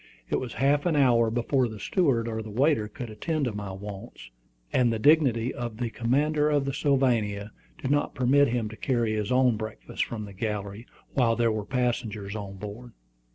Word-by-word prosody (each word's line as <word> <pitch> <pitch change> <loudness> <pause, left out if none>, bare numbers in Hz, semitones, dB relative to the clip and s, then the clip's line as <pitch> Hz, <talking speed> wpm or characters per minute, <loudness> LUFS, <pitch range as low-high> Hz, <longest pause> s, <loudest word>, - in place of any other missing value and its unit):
It - - +2
was 125 -2 -5
half 145 +4 +2
an 165 - +1
hour 120 -5 +4
before 120 +3 +1
the 110 -2 -8
steward 125 - +1
or 110 -1 -3
the 110 - -8
waiter 120 0 +2
could 115 +2 -7
attend 155 +7 -2
to 120 - -2
my 105 -1 -5
wants; 95 -10 -9 0.4
and 125 -2 +3
the 115 - 0
dignity 130 -2 +3
of 120 -2 -5
the 120 -1 -2
commander 150 +6 +1
of 145 -2 +2
the 135 - -2
Sylvania 120 -8 +1 0.3
did 130 - -2
not 145 0 +1
permit 135 +3 +4
him 115 -2 -1
to 110 - -9
carry 120 -3 0
his 105 0 -2
own 125 -3 +4
breakfast 105 - -4
from 110 -2 -5
the 100 - -10
galley, 105 +2 -4 0.3
while 120 -4 +3
there 115 -1 +2
were 110 -2 -3
passengers 110 -5 -2
on 100 -2 -6
board. 105 +4 -8
115 Hz, 195 wpm, -27 LUFS, 105-130 Hz, 0.4 s, hour